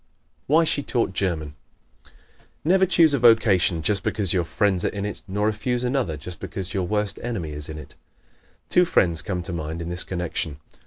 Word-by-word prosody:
Why 160 Hz, +4 st, +5 dB
She 150 Hz, -2 st, 0 dB
Taught 120 Hz, -7 st, -1 dB
German 85 Hz, -6 st, -2 dB, 0.5 s
¶ -, -, -22 dB, 0.6 s
Never 190 Hz, +3 st, +4 dB
choose 165 Hz, -4 st, +5 dB
a 140 Hz, -, +2 dB
vocation 105 Hz, -8 st, +4 dB
just 100 Hz, +4 st, +3 dB
because 100 Hz, -5 st, +1 dB
your 90 Hz, -2 st, +2 dB
friends 95 Hz, +1 st, 0 dB
are -, -, +2 dB
in 100 Hz, -1 st, -3 dB
it, 105 Hz, -, -5 dB
nor 100 Hz, +2 st, -1 dB
refuse 120 Hz, +3 st, -1 dB
another 125 Hz, -, -1 dB
just 85 Hz, +3 st, -9 dB
because 95 Hz, -1 st, -6 dB
your 95 Hz, -3 st, -1 dB
worst 105 Hz, 0 st, -2 dB
enemy 105 Hz, -10 st, -4 dB
is 75 Hz, +1 st, -5 dB
in 80 Hz, -, -6 dB
it. 75 Hz, -, -11 dB, 0.7 s
Two 180 Hz, -, +4 dB
friends 85 Hz, -, +2 dB
come 90 Hz, -2 st, -3 dB
to 95 Hz, -, -6 dB
mind 80 Hz, 0 st, -4 dB
in 85 Hz, 0 st, -5 dB
this 90 Hz, +1 st, -4 dB
connection. 85 Hz, -4 st, -3 dB
95 Hz, 195 wpm, -24 LUFS, 85-115 Hz, 0.7 s, Why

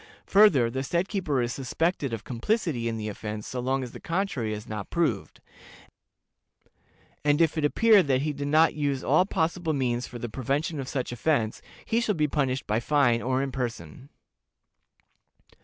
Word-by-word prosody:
Further, 165 Hz, -, +5 dB
the 130 Hz, +2 st, -2 dB
said 170 Hz, +7 st, -1 dB
keeper 155 Hz, -, -1 dB
is 120 Hz, -, -2 dB
suspected 140 Hz, +2 st, -1 dB
of 115 Hz, -2 st, -4 dB
complicity 130 Hz, -, -1 dB
in 115 Hz, -1 st, -2 dB
the 110 Hz, -1 st, -4 dB
offense 105 Hz, 0 st, -5 dB
so 130 Hz, -, -5 dB
long 130 Hz, +2 st, 0 dB
as 125 Hz, -, -7 dB
the -, -, -10 dB
contrary 165 Hz, -, -2 dB
is 105 Hz, 0 st, -6 dB
not 105 Hz, -2 st, -6 dB
proved, 160 Hz, -, -1 dB, 1.8 s
and 145 Hz, 0 st, +3 dB
if 165 Hz, -1 st, +3 dB
it 155 Hz, -, -1 dB
appear 215 Hz, +7 st, +5 dB
that 135 Hz, -5 st, +1 dB
he 150 Hz, 0 st, -1 dB
did 140 Hz, 0 st, -4 dB
not 155 Hz, +3 st, +4 dB
use 140 Hz, -3 st, -1 dB
all 155 Hz, +7 st, +3 dB
possible 165 Hz, -2 st, -1 dB
means 125 Hz, -3 st, -1 dB
for 120 Hz, -, -8 dB
the 120 Hz, -, -5 dB
prevention 140 Hz, +7 st, -2 dB
of 130 Hz, -, -5 dB
such 130 Hz, -4 st, -3 dB
offense, 120 Hz, -3 st, 0 dB, 0.2 s
he 230 Hz, +1 st, +1 dB
shall 215 Hz, -3 st, 0 dB
be 150 Hz, -2 st, +1 dB
punished 135 Hz, -3 st, -1 dB
by 105 Hz, +2 st, 0 dB
fine 120 Hz, -3 st, +2 dB
or 130 Hz, +1 st, 0 dB
in 135 Hz, -, -3 dB
person. 120 Hz, -, -5 dB
135 Hz, 175 wpm, -27 LUFS, 120-160 Hz, 1.8 s, Further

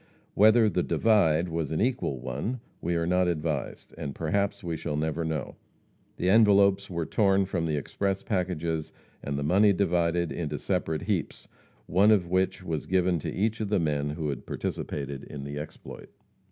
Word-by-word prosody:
Whether 110 Hz, +2 st, +6 dB
"the 95 Hz, -3 st, +1 dB
divide" 90 Hz, -7 st, +3 dB
was 80 Hz, -3 st, -2 dB
an 80 Hz, -, -1 dB
equal 120 Hz, -, 0 dB
one 120 Hz, -, -4 dB, 0.2 s
we 85 Hz, +1 st, -1 dB
are 85 Hz, 0 st, 0 dB
not 90 Hz, +1 st, +2 dB
advised, 75 Hz, -5 st, -3 dB
and 70 Hz, -, -5 dB
perhaps 100 Hz, +5 st, -1 dB
we 85 Hz, -2 st, -2 dB
shall 80 Hz, -1 st, -3 dB
never 80 Hz, +1 st, -1 dB
know. 80 Hz, -1 st, -4 dB, 0.6 s
The 90 Hz, -, -1 dB
envelopes 100 Hz, -1 st, +5 dB
were 85 Hz, -3 st, -2 dB
torn 100 Hz, 0 st, +2 dB
from 85 Hz, -3 st, -2 dB
the 75 Hz, -2 st, 0 dB
express 95 Hz, +6 st, -2 dB
packages 85 Hz, -5 st, -2 dB, 0.3 s
and 70 Hz, 0 st, -3 dB
the 70 Hz, -, -2 dB
money 100 Hz, +7 st, +4 dB
divided 85 Hz, -3 st, +1 dB
into 75 Hz, -3 st, -3 dB
separate 80 Hz, +2 st, -2 dB
heaps, -, -, -3 dB, 0.4 s
one 95 Hz, +5 st, +4 dB
of 100 Hz, -5 st, +4 dB
which 95 Hz, +1 st, 0 dB
was 80 Hz, -4 st, -3 dB
given 90 Hz, -2 st, +2 dB
to -, -, -4 dB
each 110 Hz, +3 st, -1 dB
of 105 Hz, -, -2 dB
the 105 Hz, -, +2 dB
men 75 Hz, -3 st, 0 dB
who 75 Hz, 0 st, -3 dB
had 70 Hz, -4 st, -5 dB
participated 70 Hz, -1 st, -4 dB
in 70 Hz, -2 st, -8 dB
the 70 Hz, +1 st, -5 dB
exploit. 75 Hz, -, -9 dB
85 Hz, 175 wpm, -27 LUFS, 75-100 Hz, 0.6 s, Whether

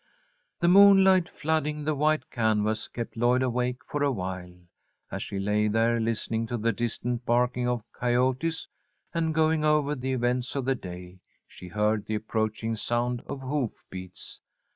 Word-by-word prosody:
The 170 Hz, -, +3 dB
moonlight 190 Hz, -1 st, +7 dB
flooding 150 Hz, -1 st, -1 dB
the 155 Hz, +1 st, 0 dB
white 150 Hz, -1 st, 0 dB
canvas 110 Hz, -1 st, 0 dB
kept 115 Hz, -1 st, -6 dB
Lloyd 120 Hz, +2 st, +2 dB
awake 125 Hz, 0 st, -1 dB
for 145 Hz, -, -3 dB
awhile. 95 Hz, -9 st, -2 dB, 0.6 s
As -, -, -4 dB
she 100 Hz, -, -5 dB
lay 105 Hz, +2 st, +1 dB
there, 115 Hz, +2 st, +2 dB
listening 115 Hz, 0 st, -1 dB
to 120 Hz, -, -2 dB
the 115 Hz, +1 st, +1 dB
distant 120 Hz, +2 st, -3 dB
barking 125 Hz, +1 st, +1 dB
of 120 Hz, -3 st, -1 dB
coyotes, 130 Hz, +6 st, 0 dB, 0.5 s
and 165 Hz, -1 st, 0 dB
going 160 Hz, 0 st, +2 dB
over 150 Hz, -1 st, +2 dB
the 130 Hz, -1 st, -3 dB
events 125 Hz, +1 st, -1 dB
of 135 Hz, -3 st, -1 dB
the 135 Hz, -, +2 dB
day, 90 Hz, -4 st, -9 dB, 0.3 s
she 90 Hz, -, -12 dB
heard 105 Hz, +2 st, 0 dB
the 110 Hz, -, -1 dB
approaching 110 Hz, +1 st, -2 dB
sound 120 Hz, +2 st, -1 dB
of 135 Hz, -, -5 dB
hoof 130 Hz, -3 st, -3 dB
beats. 95 Hz, -1 st, -8 dB
120 Hz, 155 wpm, -27 LUFS, 110-145 Hz, 0.6 s, moonlight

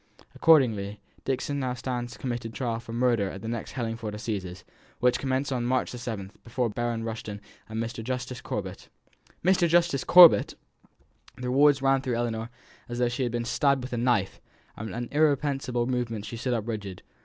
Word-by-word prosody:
Accordingly, 110 Hz, -10 st, +3 dB, 0.3 s
Dixon 135 Hz, +2 st, -1 dB
now 130 Hz, -2 st, -2 dB
stands 120 Hz, -1 st, -4 dB
committed 120 Hz, -3 st, -4 dB
for -, -, -8 dB
trial 115 Hz, -3 st, -1 dB
for 115 Hz, -, -10 dB
murder 120 Hz, -4 st, +1 dB
at 95 Hz, -, -8 dB
the -, -, -5 dB
next 115 Hz, -1 st, -4 dB
Hellingford 115 Hz, -4 st, -4 dB
Assizes, 95 Hz, -5 st, -5 dB, 0.3 s
which 125 Hz, 0 st, +3 dB
commence 135 Hz, +1 st, -1 dB
on 125 Hz, -2 st, -1 dB
March 130 Hz, 0 st, 0 dB
the 125 Hz, -, -7 dB
seventh, 105 Hz, -5 st, -6 dB
before 120 Hz, -1 st, -1 dB
Baron 120 Hz, 0 st, -2 dB
Rushton 110 Hz, -2 st, -5 dB, 0.3 s
and 110 Hz, 0 st, -4 dB
Mr. 115 Hz, 0 st, -4 dB
Justice 125 Hz, 0 st, -4 dB
Corbet." -, -, -5 dB, 0.6 s
"Mr. 185 Hz, -2 st, +4 dB
Justice 170 Hz, -5 st, +3 dB
Corbet!" 175 Hz, -2 st, +8 dB, 0.8 s
The 125 Hz, 0 st, -3 dB
words 140 Hz, +1 st, +4 dB
ran 135 Hz, 0 st, +3 dB
through 125 Hz, -2 st, -2 dB
Ellinor 115 Hz, -1 st, -2 dB, 0.4 s
as 120 Hz, -, -4 dB
though 125 Hz, -1 st, +2 dB
she 120 Hz, +3 st, -3 dB
had 120 Hz, -2 st, 0 dB
been 120 Hz, 0 st, -2 dB
stabbed 140 Hz, 0 st, +2 dB
with 125 Hz, -, -6 dB
a -, -, -1 dB
knife, 115 Hz, -5 st, +1 dB, 0.3 s
and 110 Hz, +1 st, -6 dB
by 100 Hz, -, -6 dB
an 120 Hz, 0 st, -3 dB
irrepressible 140 Hz, -5 st, +1 dB
movement 120 Hz, -4 st, -2 dB
she 115 Hz, -, -6 dB
stood 120 Hz, +2 st, -1 dB
up 110 Hz, -1 st, -3 dB
rigid. 100 Hz, -5 st, -5 dB
120 Hz, 185 wpm, -27 LUFS, 115-130 Hz, 0.8 s, Corbet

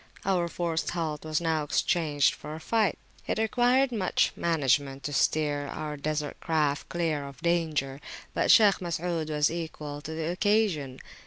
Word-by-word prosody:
Our 180 Hz, -3 st, +1 dB
forced 170 Hz, -1 st, -2 dB
halt 160 Hz, -4 st, -3 dB
was 155 Hz, -1 st, -1 dB
now 160 Hz, -2 st, 0 dB
exchanged 150 Hz, -1 st, +2 dB
for 150 Hz, +1 st, -8 dB
a -, -, -7 dB
flight. 215 Hz, +5 st, +1 dB, 0.3 s
It -, -, -1 dB
required 245 Hz, +4 st, +3 dB
much 205 Hz, -6 st, +1 dB
management 140 Hz, -4 st, +1 dB
to 145 Hz, -, -4 dB
steer 145 Hz, 0 st, +1 dB
our 150 Hz, +1 st, -5 dB
Desert 150 Hz, 0 st, -3 dB
craft 150 Hz, -3 st, 0 dB
clear 160 Hz, -5 st, -1 dB
of 135 Hz, -2 st, -11 dB
danger; 155 Hz, -5 st, 0 dB, 0.3 s
but -, -, 0 dB
Shaykh 210 Hz, -4 st, +7 dB
Masud 170 Hz, -2 st, -2 dB
was 150 Hz, 0 st, +2 dB
equal 155 Hz, -3 st, -5 dB
to 150 Hz, +2 st, -7 dB
the 160 Hz, +1 st, -2 dB
occasion. 180 Hz, -9 st, +1 dB
160 Hz, 155 wpm, -28 LUFS, 145-175 Hz, 0.3 s, Shaykh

